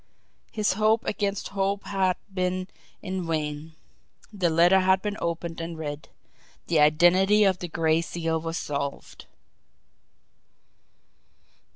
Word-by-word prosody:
His 215 -3 0
hope 215 +2 +2
against 200 -1 -2
hope 195 0 -1
had 190 -2 0 0.2
been 185 0 -1 0.4
in 185 -3 -4
vain 155 0 -3 0.6
the 185 -4 +1
letter 175 +4 +5
had 190 0 +3
been 205 -1 -2
opened 170 0 -3
and 165 0 -6
read 150 -1 -6 0.6
THE 165 -3 +1
IDENTITY 175 +7 +5
OF 190 -2 +2
THE 175 - -5
GRAY 160 -1 +1
SEAL 165 -1 -2
WAS 165 +1 -4
SOLVED. 140 -3 -5
175 Hz, 115 wpm, -26 LUFS, 160-195 Hz, 0.6 s, letter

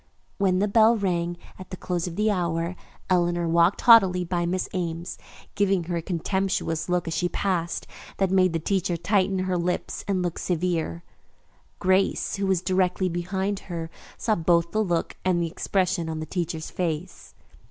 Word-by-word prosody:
When 190 -2 +3
the 205 +2 +2
bell 225 +2 +5
rang 175 -3 -1 0.2
at 185 - -10
the 185 - -7
close 175 -1 -2
of 170 - -6
the 215 +2 +2
hour, 170 -2 -1 0.3
Eleanor 175 -1 +1
walked 170 +3 +3
haughtily 190 -6 +6
by 175 0 -1
Miss 185 +1 -1
Ames, 170 -1 -4 0.3
giving 195 -3 +1
her 170 +1 -3
a - - -2
contemptuous 180 -2 -1
look 180 -1 0
as 165 - -2
she 175 +2 0
passed 175 -4 -1 0.3
that 195 -2 +1
made 185 -2 +3
the - - +1
teacher 180 0 0
tighten 190 +2 +1
her 185 -1 0
lips 180 +1 -2
and 190 -2 0
look 175 -1 -3
severe. 170 - -1 0.7
Grace, 190 +2 +1
who 195 0 -1
was 185 -2 +1
directly 185 0 +1
behind 190 +3 -2
her, 165 -2 -5 0.3
saw 220 - +1
both 170 -2 +2
the 215 +3 +1
look 175 -4 -1
and 185 -2 +2
the 170 - +1
expression 180 -3 0
on 160 -1 -3
the 155 - -4
teacher's 165 -2 -4
face. 170 -1 -4
180 Hz, 175 wpm, -25 LUFS, 170-190 Hz, 0.7 s, haughtily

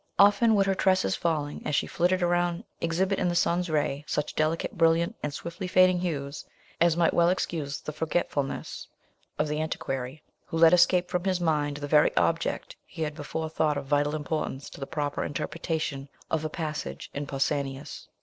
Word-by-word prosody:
Often 205 +3 +5
would 200 -1 +4
her 195 - +2
tresses 185 - +2
falling, 150 -3 -2
as 150 - -1
she - - +2
flitted 180 +1 +1
around, 175 +1 +1 0.2
exhibit 185 +4 0
in - - +1
the 175 - 0
sun's 175 +1 +1
ray 145 -2 0
such 150 0 -2
delicately 160 +7 -1
brilliant 170 +4 +3
and 150 - -2
swiftly 170 +5 -6
fading 185 0 +5
hues, 145 -5 -3 0.4
it 170 -1 +4
might 170 -1 +3
well 170 0 +4
excuse 155 -5 -2
the - - -6
forgetfulness 155 -2 -2 0.5
of 150 - +1
the 150 +1 -1
antiquary, 135 -2 -4 0.2
who 165 - -3
let 165 +1 +7
escape 180 0 +4
from 180 0 -2
his 185 -2 +1
mind 150 -4 0
the 145 -1 -5
very 150 0 +5
object 165 0 0
he 165 -3 -6
had 150 -1 -2
before 160 +1 -4
thought 155 -2 0
of 140 - -4
vital 145 +2 +1
importance 150 -2 -3
to - - -11
the 135 - -5
proper 145 -2 -2
interpretation 150 -2 -3 0.2
of 160 -1 0
a 155 - -2
passage 150 - -5
in 145 0 -4
Pausanias. 140 0 -2
160 Hz, 180 wpm, -27 LUFS, 145-175 Hz, 0.5 s, let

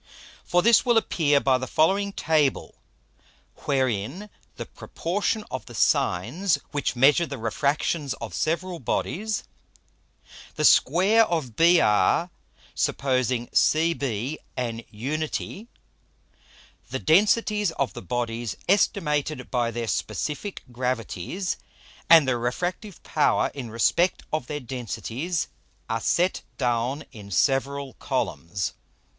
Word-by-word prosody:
For 175 0 +2
this 235 -1 +6
will 240 -2 +3
appear 150 -9 +2
by 130 -2 +2
the 130 - -4
following 195 +9 +2
Table, 155 -7 +1 0.9
wherein 135 - -1 0.2
the - - -6
Proportion 205 +5 -3
of 130 -5 -5
the - - -10
Sines 150 - +1
which 145 -3 -1
measure 145 +7 +4
the 140 - -6
Refractions 140 +5 -1
of 110 -6 -8
several 170 - -1
Bodies, 205 - -2 1.1
the - - +1
Square 195 - +5
of 150 -10 -2
BR, 165 - +4 0.4
supposing 130 -3 0
CB 145 -5 +1 0.2
an 115 -2 -3
unite, 155 - -4 1.2
the - - -2
Densities 210 +4 +3
of 140 -4 -1
the - - -7
Bodies 115 +2 -3
estimated 155 -8 +1
by 120 -2 +1
their 115 0 -4
Specifick 155 - -3
Gravities, 125 - -3 0.5
and 165 -4 +8
their 125 -2 +1
Refractive 175 - -3
Power 150 - +2
in 130 -5 -6
respect 170 +11 +1
of 155 -5 -1
their 150 - -3
Densities 130 - -3 0.4
are 115 0 -2
set 180 +2 +1 0.2
down 125 +3 0
in 105 -4 -11
several 135 +4 0
Columns. 95 +4 -2
140 Hz, 110 wpm, -25 LUFS, 120-175 Hz, 1.2 s, and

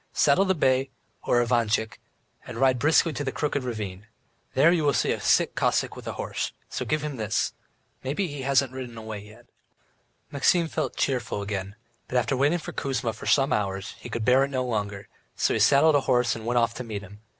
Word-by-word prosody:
"Saddle 150 +7 +4
the 190 0 +2
bay, 130 -3 +2 0.3
or 120 0 +2
Ivantchik, 115 -2 0 0.5
and 125 - -7
ride 130 0 +3
briskly 155 +3 +3
to 145 - -3
the 135 - -2
Crooked 145 -1 -2
Ravine. 105 -4 -5 0.5
There 150 +5 +6
you 170 -3 +2
will 145 -3 +2
see - - +1
a - - -2
sick - - +3
Cossack - - 0
with - - -10
a - - -3
horse, - - -4 0.2
so - - -4
give 155 0 -1
him 150 -3 -4
this. 110 -2 -1 0.5
Maybe 145 +9 -1
he 145 -5 -6
hasn't 135 -1 +2
ridden 125 -3 -7
away 110 -2 -6
yet." 105 +4 -15 0.9
Maxim 165 +4 +2
felt - - -3
cheerful 120 -6 -1
again, 100 -1 -4 0.3
but 125 - -1
after 125 +2 +1
waiting 145 +6 +2
for 160 - -7
Kuzma 125 -4 -2
for - - -9
some 135 -1 +3
hours, 100 0 -2
he - - -9
could 110 -1 -3
bear 130 +2 +5
it 135 - -1
no 130 -2 -1
longer, 105 -4 -3 0.3
so - - +1
he - - 0
saddled 145 +3 +5
a 145 - +4
horse 125 -2 +2
and 115 0 -7
went 120 +1 +1
off 115 -1 +2
to 125 - -6
meet 105 -4 -6
him. 100 +2 -13
125 Hz, 210 wpm, -26 LUFS, 110-140 Hz, 0.9 s, There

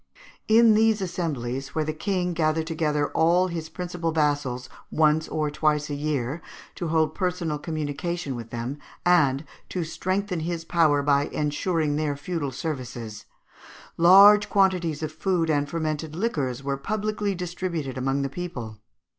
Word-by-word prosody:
_ - - -26 0.3
In 225 0 +6
these 220 0 +3
assemblies, 140 -8 -3
where 155 -1 +1
the 155 - -2
King 180 +2 -1
gathered 160 -1 +1
together 150 -3 0
all 175 +3 +3
his 165 -2 -5
principal 175 -2 -3
vassals 145 -5 0 0.2
once 155 0 +2
or 150 -1 -1
twice 150 0 0
a - - -1
year, 145 0 -2 0.3
to 175 - -4
hold 160 -1 +1
personal 180 -5 -2
communication 155 -1 -3
with 115 -1 -7
them, 120 +5 -4 0.3
and 150 -5 +3 0.2
to 180 - -2
strengthen 185 +3 -2
his 165 +1 -3
power 155 -5 +3
by 140 0 +3
ensuring 150 0 -1
their 150 -2 -1
feudal 150 -1 -3
services, 125 -7 -5 0.7
large 200 +4 +7
quantities 180 -6 +2
of 155 - -3
food 165 0 0
and 145 -1 0
fermented 155 -1 -3
liquors 145 - -2
were 140 0 -1
publicly 210 +3 -2
distributed 175 -5 -4
among 135 +2 0
the - - 0
people 140 -7 -6
(Fig. - - -38
155 Hz, 150 wpm, -25 LUFS, 145-180 Hz, 0.7 s, large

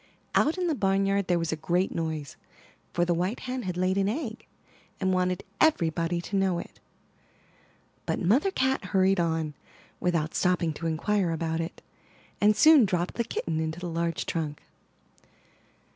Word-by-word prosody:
Out 315 +5 +3
in 365 - 0
the 335 - +1
barnyard 195 -4 +1
there 175 - +2
was 165 -1 -1
a - - 0
great 175 +4 0
noise, 160 -4 -3 0.6
for 175 - +1
the 175 - +1
white 180 +7 -1
hen 255 0 -3
had 180 -5 -4
laid 185 +2 +1
an 195 0 +2
egg, 230 -2 -4 0.5
and 190 -1 +1
wanted 180 -1 0 0.2
everybody 170 - +2
to 200 - -5
know 190 -2 +2
it; 170 - -8 1.3
but - - 0
Mother 235 - +3
Cat 265 -7 0
hurried 190 0 +2
on, 160 -2 0 0.5
without 165 -3 0
stopping 180 -3 +1
to 165 +2 -4
inquire 180 +4 0
about 165 0 -1
it, 165 - -7 0.6
and 210 +1 +5
soon 310 -1 +7
dropped 180 -3 0
the 235 - -1
kitten 160 -7 -3
into 160 +1 -3
the 180 -1 -4
large 165 -2 -2
trunk. 155 -3 -3
180 Hz, 160 wpm, -27 LUFS, 165-200 Hz, 1.3 s, soon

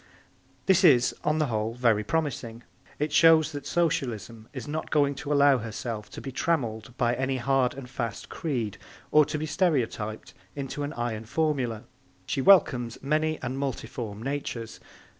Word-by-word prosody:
This 190 -1 +4
is, 130 -8 +6
on 150 +1 +1
the 155 - +2
whole, 110 -2 -2
very 115 -4 +2
promising. 120 -4 -2 0.3
It 150 +1 -1
shows 160 0 +6
that 145 -2 -6
Socialism 115 - -1
is 135 0 -7
not 155 +2 -4
going 145 -2 +3
to 140 +2 -6
allow 140 -2 +5
herself 110 -1 -5
to - - -9
be 135 - -6
trammelled 120 -6 -2
by 120 -1 +2
any 130 +1 -1
hard 130 0 +1
and 135 -2 -8
fast 115 -4 -4
creed 120 - -3 0.3
or 150 -1 +6
to 155 - -3
be 155 - -3
stereotyped 125 - -1 0.2
into 140 0 -4
an 145 +1 -3
iron 115 -2 -3
formula. 130 -5 -1 0.4
She 135 - -1
welcomes 130 -9 +4
many 155 +2 0
and 130 +2 -3
multiform 115 -5 -4
natures. 130 -4 -4
130 Hz, 160 wpm, -27 LUFS, 115-150 Hz, 0.4 s, is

